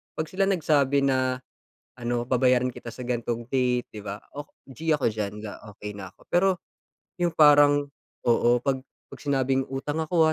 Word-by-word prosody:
'pag 155 0 -4
sila 195 +1 +1
nagsabi 145 -7 +2
na 130 -1 +1 0.5
ano, 120 -1 -2
babayaran 125 0 +2
kita 120 - -8
sa 125 +1 -8
gan'tong 120 -1 -2
date, 125 -2 +1
di 105 - -7
ba? 100 0 -5 0.2
Oh, 145 +1 -7 0.2
g 160 +4 -4
ako 150 -3 +2
diyan, 105 -1 -3 0.4
okey 105 0 -6
na 95 -2 -8
ako. - - -25
Pero 185 +2 +3 0.7
yung 175 -1 0
parang 145 -1 +6 0.4
oo. 120 0 +4
'Pag 130 +2 -1 0.3
'pag - - -10
sinabing 135 -2 0
utang 145 +4 -3
ako, 160 0 +3
130 Hz, 165 wpm, -26 LUFS, 120-145 Hz, 0.7 s, parang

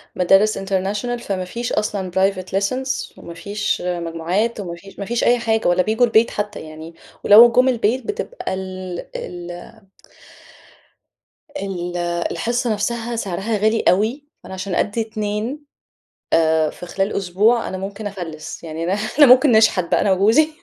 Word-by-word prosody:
مدارس 195 +4 +3
international 200 +5 -2
فما 185 -2 -3
فيش 235 +6 -4
أصلًا 195 -3 -2
private 190 0 +1
lessons 260 +7 -3
وما 170 - -10
فيش 200 +5 -3
مجموعات 175 +6 -2
وما 175 -4 -5
فيش 195 +4 -15
ما 200 - -4
فيش 235 +3 -1
أي 245 0 +4
حاجة، 225 -1 0
ولا 175 +1 +3
بييجوا 220 +4 +2
البيت 230 0 +3
حتى 210 0 -4
يعني، 155 +1 -10 0.3
ولو 230 +3 +8
جُم 250 +2 +4
البيت 240 +1 0
بتبقى 425 - -4
ال 185 -1 -6 0.2
ال 175 +5 -8 1.7
ال 180 -5 -4 0.3
الحصّة 240 0 -1
نفسها 235 +3 -2
سعرها 205 +1 -2
غالي 220 +2 +2
أوي، 220 +10 +1 0.2
فأنا - - -9
عشان 190 -1 -4
أدّي 210 +2 0
2 220 +6 -4 0.7
آآ 160 -1 +3
في 180 - -10
خلال 195 +3 -2
أسبوع 205 +5 +1
أنا 190 - -5
ممكن 200 +2 -6
أفلِّس، 175 -6 -7
يعني 160 0 -5
أنا 180 - -1 0.3
أنا 295 - +9
ممكن 255 +2 +6
نشحت 220 -5 +4
بقى - - +1
أنا 195 - +2
وجوزي. 220 +11 +4
200 Hz, 150 wpm, -20 LUFS, 180-230 Hz, 1.7 s, أنا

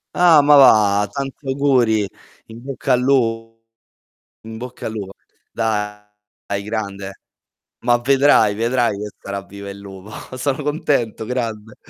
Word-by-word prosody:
Ah, 170 -4 +6
ma 145 +1 +5
va! 105 -6 +5
Tanti 135 0 -6
auguri. 125 -7 +2 0.4
In 115 +1 -12
bocca 135 -1 -1
al 125 - +2
lu 115 -4 +1 0.9
in 110 0 -9
bocca 125 +1 -8
al - - -4
lupo. 100 -3 -6 0.4
Dai 105 -2 -4
grande. 100 -3 -5 0.6
Ma 120 0 +4
vedrai, 135 -5 +4
vedrai 115 -2 0
che 105 0 -5
sarà 100 0 -6
viva 100 +1 -10
il 100 - -8
lupo. 100 0 -11 0.3
Sono 140 +2 -2
contento, 140 -7 -1
grande. 110 -3 -4
115 Hz, 130 wpm, -19 LUFS, 105-130 Hz, 0.9 s, Ah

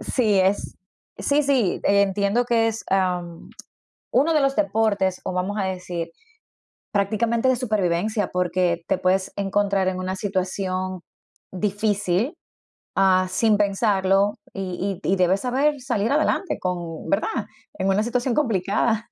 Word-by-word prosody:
Sí, 215 -6 +1
es 190 +2 0 0.4
sí, 290 +1 +2
sí, 265 -9 +1
entiendo 200 +3 +2
que 230 -1 +2
es, 225 0 -4
ah, 185 -2 +1 0.9
uno 305 +6 +3
de 300 - +4
los 275 0 +1
deportes, 205 - +1
o - - -2
vamos 190 +3 -2
a 195 - 0
decir, 180 -3 -4 0.8
prácticamente, 225 +5 +1
de 260 - +3
supervivencia, 210 -3 0
porque 175 -1 0
te - - +1
puedes 185 +1 +1
encontrar 200 -1 0
en 185 0 -1
una 185 +1 -3
situación 185 -1 -2 0.5
difícil, 205 - 0 0.6
ah, 185 -1 +4
sin 215 +2 +3
pensarlo, 200 -1 +2 0.2
y 190 0 -4
y - - 0
y - - +3
debes 185 +2 +2
saber 275 +3 +1
salir 225 -2 -1
adelante 310 +5 +1
con 175 -3 -4
¿verdad?, 295 +9 0 0.3
en 190 0 0
una 195 +2 +2
situación 245 +1 -1
complicada. 225 -2 0
200 Hz, 135 wpm, -23 LUFS, 185-225 Hz, 0.9 s, de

